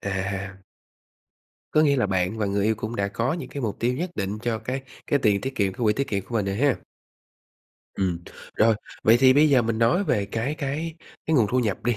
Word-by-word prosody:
À. 95 0 -4 1.1
Có 155 - +4
nghĩa 140 -2 +4
là 120 - +2
bạn 95 +2 -1
và 105 - 0
người 100 0 0
yêu 110 0 +2
cũng 110 +2 -5
đã 100 0 0
có 115 +8 -1
những 170 - -5
cái 140 - -6
mục 110 -5 -2
tiêu 120 +2 +1
nhất 170 +7 -3
định 100 +1 -2
cho 115 -2 -1
cái 130 +4 -4 0.2
cái 145 - +2
tiền 105 -5 +2
tiết 135 0 -4
kiệm, 100 -2 +1
cái 110 - -11
quỹ 105 - +4
tiết 140 +5 -2
kiệm 100 -2 -2
của 120 - -9
mình 105 -3 +1
rồi 100 0 -1
ha? 140 +1 +2 1.2
Ừm. 90 -3 -1 0.4
Rồi, 110 0 +4 0.3
vậy 110 +2 +6
thì 130 -1 +7
bây 150 +2 +5
giờ 130 -4 +5
mình 110 0 -1
nói 120 +13 +3
về 100 - 0
cái 120 +8 -2
cái 155 +2 -3 0.3
cái 160 - +1
nguồn 110 -5 +4
thu 130 - +2
nhập 105 -6 0
đi. 120 -3 +1
115 Hz, 235 wpm, -25 LUFS, 100-135 Hz, 1.2 s, thì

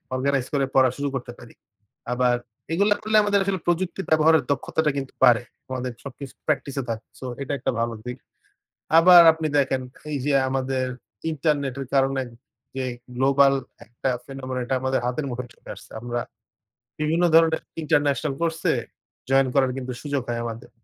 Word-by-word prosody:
Organise 135 0 0
করে 140 -1 +2
পড়া 130 -1 +6
শুরু 140 0 -1
করতে 125 -2 -4
পারি। 120 - -13 0.6
আবার 125 0 +2 0.4
এগুলো 200 +5 +2
করলে 215 0 +2
আমাদের 205 -1 +2
আসলে 190 -1 -1
প্রযুক্তি 175 +2 0
ব্যবহারের 160 +1 +5
দক্ষতাটা 150 +2 0
কিন্তু 135 -1 -4
বাড়ে। 120 -2 +6 0.3
আমাদের 130 -1 -3
সবকিছু 140 -1 -8
প্র্যাকটিসে 140 -2 -1
থাকে। 115 +3 -4
সো - - -8 0.2
এটা 140 - -3
একটা - - 0
ভালো 115 0 0
দিক। 125 +1 -5 0.8
আবার 175 +1 +9
আপনি 160 0 -3
দেখেন 135 -1 +1 0.3
এইযে 145 0 -1 0.2
আমাদের 130 0 -1 0.5
ইন্টারনেটের 140 -3 -1
কারণে 135 0 +2 0.5
যে 130 - -1 0.3
গ্লোবাল 135 +1 +4 0.3
একটা 120 +3 -4 0.2
phenomenon 130 -1 -5
এটা 125 - -1
আমাদের 130 0 0
হাতের 135 +4 -2
মুখে 125 +1 -4
চলে - - -14
আসছে। - - -15
আমরা 120 +1 -3 0.8
বিভিন্ন 160 +3 +2
ধরনের 160 0 +5 0.2
ইন্টারন্যাশনাল 145 -1 +1
কোর্সে 165 -1 +1 0.6
জয়েন 135 0 +4
করার 135 -2 +3 0.3
সুযোগ 145 -2 -2
হয় 120 -1 -2
আমাদের। 115 -1 -7
135 Hz, 150 wpm, -24 LUFS, 130-155 Hz, 0.8 s, আবার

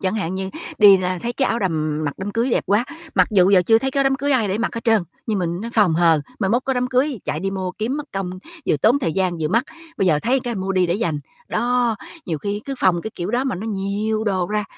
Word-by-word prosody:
Chẳng 190 +1 -1
hạn 185 -3 -2
như 190 0 -3 0.3
đi 200 -2 +8
ra 185 0 -2
thấy 240 0 -2
cái 265 +1 0
áo 230 - 0
đầm 155 -6 -1
mặc 145 - -2
đám 195 +2 -4
cưới 235 +3 0
đẹp - - +1
quá, 205 +5 +2 0.3
mặc - - +4
dù 190 -3 +4
giờ 185 -3 +6
chưa 225 +4 +4
thấy 265 +2 -1
cái 275 0 +1
đám 270 0 +3
cưới 280 +1 0
ai 225 -6 +2
để 195 - -1
mặc 240 - -1
hết 230 - -5
trơn, 225 -4 +4 0.2
nhưng 215 -3 0
mình, 175 0 -2
nó, 230 - -4
phòng 205 -7 +4
hờ, 165 -2 +4 0.2
mai 195 -3 0
mốt 240 +3 +1
có 265 - 0
đám 250 0 0
cưới 255 - 0
chạy - - -2
đi 195 - -2
mua 190 -2 -3
kiếm 230 +8 -2
mất 295 - -4
công, 195 -2 -3 0.4
vừa - - +3
tốn 235 - +3
thời 165 - -1
gian 185 -2 0
vừa 155 - 0
mắc, 230 +6 +2 0.3
bây 195 - +1
giờ 155 -4 +4
thấy 260 +2 +2
cái 240 -2 -3
mua 195 0 -2
đi 185 -1 +2
để 170 - 0
dành. 165 -8 -1 0.3
Đó, 240 -2 +1 0.3
nhiều 160 -3 -2
khi 205 +4 -3
cứ 275 - -4
phòng 175 -5 +2
cái 220 - -5
kiểu 175 +3 -4
đó 245 +3 0
mà 265 - -1
nó 200 +5 -5
nhiều 210 +1 -2
đồ 185 -4 0
ra, 210 +1 -1
205 Hz, 285 wpm, -21 LUFS, 185-235 Hz, 0.4 s, đi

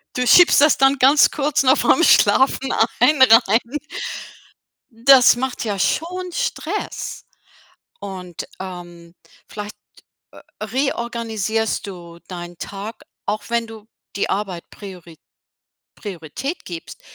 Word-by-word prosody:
Du 250 - -1
schiebst 330 +4 +6
das 300 0 +4
dann 270 +1 +3
ganz 275 +3 +5
kurz 295 -2 0
noch 260 +2 +4
vorm 340 - +3
Schlafen 265 +2 +3 0.3
ein 300 -3 +3
rein. 225 -3 +6 1.3
Das 245 +2 +6
macht 260 +1 -4
ja 205 -2 -2
schon 360 - -2
Stress. - - -4 0.8
Und, 185 -3 -8
ähm, 175 -2 -10 0.3
vielleicht, 210 0 -8 0.6
äh, - - -15 0.2
reorganisierst 230 -5 -2
du 170 -3 -11
deinen 175 -1 -9
Tag, 205 +6 -8 0.2
auch 205 +1 -3
wenn 235 0 -1
du 220 -2 -12 0.3
die 200 - -1
Arbeit 195 -4 -4
Priori 180 -5 -12 0.8
Priorität 205 - -7
gibst. 170 -2 -9
220 Hz, 110 wpm, -20 LUFS, 185-265 Hz, 1.3 s, schiebst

